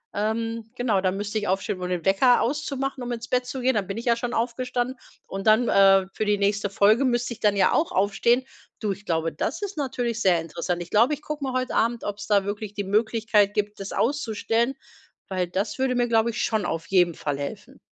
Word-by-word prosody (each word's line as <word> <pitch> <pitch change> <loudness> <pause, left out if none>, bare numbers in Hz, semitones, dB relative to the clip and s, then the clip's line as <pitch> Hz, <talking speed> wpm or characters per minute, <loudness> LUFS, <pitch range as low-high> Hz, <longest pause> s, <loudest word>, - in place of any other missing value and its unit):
ähm, 225 +2 -2
genau, 230 -6 +1
da 185 - +2
müsste 205 +2 -3
ich 210 - -4
aufstehen, 190 0 -1
um 180 - -3
den 180 -2 -3
Wecker 240 +6 +4
auszumachen, 275 0 -2
um 245 - -4
ins 235 -1 -5
Bett 250 0 0
zu 260 +1 -5
gehen. 260 +1 +2
Dann 205 -5 -1
bin 195 - -4
ich 230 - -6
ja 235 -1 +4
schon 240 +1 -4
aufgestanden. 245 +2 -1 0.3
Und 195 +2 -5
dann, 220 +2 +5
äh, 195 -1 +5
für 215 - -2
die 210 0 +2
nächste 205 +1 0
Folge 210 +6 +4
müsste 240 -2 0
ich 225 - -14
dann 210 -2 +2
ja 195 - +3
auch 325 - +1
aufstehen. 210 +6 +2 0.4
Du, 210 -2 -1
ich 200 +2 -7
glaube, 165 -1 0
das - - -3
ist 405 0 -4
natürlich 245 -5 -2
sehr 180 -4 +4
interessant. 170 +2 -3
Ich 175 - -16
glaube, 235 +8 +4
ich 295 - -19
gucke 300 -1 -5
mal 265 -2 -2
heut 255 0 -1
Abend, 235 +1 0
ob 205 -1 -4
es 205 - -8
da 205 -2 +3
wirklich 205 0 -5
die 205 - -2
Möglichkeit 215 0 +2
gibt, 210 0 -2
das 195 0 -6
auszustellen, 235 -1 0 0.5
weil 185 -2 -1
das 195 +8 -3
würde 260 -1 +1
mir, 245 0 +2
glaube 230 0 +2
ich, 235 - -2
schon 220 -2 0
auf 165 +1 -3
jeden 175 -3 +3
Fall 145 -2 -3
helfen. 140 0 -7
220 Hz, 230 wpm, -25 LUFS, 195-245 Hz, 0.5 s, dann